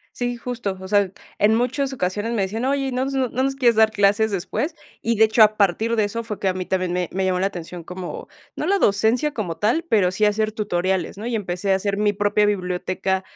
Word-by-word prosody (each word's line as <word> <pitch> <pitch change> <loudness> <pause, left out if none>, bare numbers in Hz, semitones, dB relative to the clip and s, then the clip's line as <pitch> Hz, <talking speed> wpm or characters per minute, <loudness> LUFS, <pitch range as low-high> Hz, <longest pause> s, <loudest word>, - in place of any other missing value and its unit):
Sí, 245 0 -2
justo, 230 -5 -4
o 190 - -8
sea, 200 -2 +2 0.3
en 210 +2 +4
muchas 265 +3 0
ocasiones 210 0 -2
me 210 -4 0
decían: 220 +6 -2
"Oye, 275 0 0
¿y 260 - -4
no 255 +1 0
s 275 - -3
no 260 -2 +1
nos 265 +3 -1
quieres 240 -4 +3
dar 220 0 +5
clases 205 +1 +2
después?" 280 - -2 0.3
Y, 230 0 0
de 220 - +6
hecho, 220 +1 +4
a 215 0 +2
partir 215 +4 +2
de 215 -2 +2
eso 230 +3 -3
fue 210 -3 -6
que 195 - +1
a 185 - 0
mí 185 -1 -4
también 185 -2 -1
me 180 -1 -1
me 190 +1 -1
llamó 185 -1 +1
la 190 - +1
atención 175 -2 -7
como, 180 0 -7 0.3
no 305 - -2
la 395 +2 +2
docencia 225 - +2
como 180 - -4
tal, 235 - +1
pero 195 - +3
sí 210 +3 0
hacer 215 +1 +2
tutoriales, 190 -3 -1
¿no?, 215 +4 -6
y 240 -2 -1
empecé 195 -1 -1
a 190 - +4
hacer 200 +1 -2
mi 205 0 +2
propia 205 +1 +2
biblioteca 185 -1 -1
210 Hz, 245 wpm, -22 LUFS, 190-235 Hz, 0.3 s, de